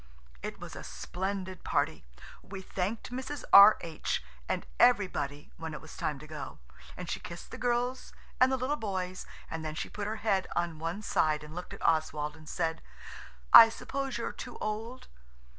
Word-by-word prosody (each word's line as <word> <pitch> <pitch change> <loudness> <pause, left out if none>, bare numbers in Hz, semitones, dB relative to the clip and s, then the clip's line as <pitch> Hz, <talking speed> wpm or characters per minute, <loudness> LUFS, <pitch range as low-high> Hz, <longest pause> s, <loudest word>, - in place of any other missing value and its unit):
It - - -6
was - - -8
a - - -7
splendid 190 0 -4
party. 145 - 0 0.4
We 190 -1 -8
thanked 195 +6 -3
Mrs. 260 +2 -5
R.H. 195 - +7 0.3
and - - -1
everybody 145 -4 +2
when 160 -1 -5
it - - -6
was 160 - -12
time 150 -2 -2
to 155 - -11
go, 150 - -7 0.4
and 180 - -6
she - - -2
kissed 170 0 -9
the - - -7
girls 245 +1 -1 0.3
and 255 +1 +6
the 265 - +2
little 265 +4 -1
boys, 185 -5 -3 0.2
and 160 0 -4
then 155 -1 -4
she - - -4
put 205 -1 -4
her 215 - -2
head 195 -4 +2
on 170 -2 -1
one 165 +6 -3
side 155 -5 +1
and 150 0 -10
looked 180 +1 -6
at - - -7
Oswald 150 -2 +1
and 155 -1 -13
said, 165 -2 -1 0.7
"I 225 -1 +12
suppose 270 +4 -4
you're - - -3
too - - -8
old?" 225 +4 -4
180 Hz, 175 wpm, -31 LUFS, 155-220 Hz, 0.7 s, I